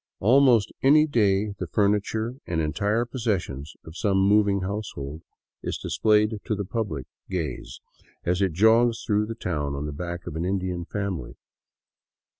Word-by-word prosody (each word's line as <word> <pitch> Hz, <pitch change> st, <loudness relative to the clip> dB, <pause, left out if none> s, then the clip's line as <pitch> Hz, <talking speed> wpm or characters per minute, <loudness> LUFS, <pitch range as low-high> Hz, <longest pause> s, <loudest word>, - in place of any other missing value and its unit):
Almost 120 Hz, -1 st, +5 dB
any 150 Hz, +3 st, +6 dB
day 105 Hz, -6 st, +2 dB
the 90 Hz, -, -3 dB
furniture 105 Hz, -, 0 dB
and 85 Hz, -2 st, -1 dB
entire 105 Hz, +9 st, 0 dB
possessions 95 Hz, -, -3 dB
of 80 Hz, -, -11 dB
some 100 Hz, 0 st, +1 dB
moving 100 Hz, 0 st, +3 dB
household 95 Hz, -7 st, -5 dB, 0.4 s
is -, -, -3 dB
displayed 105 Hz, 0 st, +2 dB
to 105 Hz, -2 st, -2 dB
public 90 Hz, -, -3 dB, 0.2 s
gaze 80 Hz, -8 st, -4 dB, 0.4 s
as 90 Hz, +2 st, 0 dB
it 95 Hz, -4 st, +1 dB
jogs 115 Hz, +5 st, +4 dB
through 105 Hz, +1 st, 0 dB
town 75 Hz, -9 st, -2 dB
on 70 Hz, +1 st, -4 dB
the 75 Hz, -, -4 dB
backs 85 Hz, +3 st, -5 dB
of -, -, -6 dB
an 80 Hz, -, -2 dB
Indian 90 Hz, -2 st, -2 dB
family. 100 Hz, -3 st, -4 dB
100 Hz, 140 wpm, -25 LUFS, 85-110 Hz, 0.4 s, any